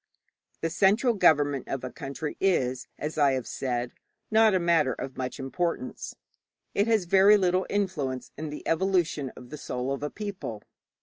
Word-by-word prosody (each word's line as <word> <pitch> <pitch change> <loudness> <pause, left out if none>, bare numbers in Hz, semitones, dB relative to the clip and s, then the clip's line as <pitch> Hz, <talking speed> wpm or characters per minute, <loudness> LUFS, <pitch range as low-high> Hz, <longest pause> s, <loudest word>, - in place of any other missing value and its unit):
The 165 - -1
central 210 +8 +3
government 145 - +3
of 135 -2 -4
a 130 - -5
country 145 +2 -5
is, 130 -10 +1
as 155 +1 -4
I 140 -2 +4
have 130 -2 -2
said, 125 -2 -3 0.4
not 220 -2 +5
a - - +3
matter 170 -6 +3
of 135 - -6
much 130 -1 -4
importance. 135 +1 -3 0.6
It 200 +2 +2
has 220 -5 +2
very 195 +4 +6
little 185 -1 +1
influence 155 -11 -2
in 155 +1 -5
the 150 - -7
evolution 165 -5 +1
of 125 -1 -12
the 150 - -7
soul 125 +1 -3
of 140 - -5
a 150 - -2
people. 195 - -6
155 Hz, 170 wpm, -27 LUFS, 135-190 Hz, 0.6 s, very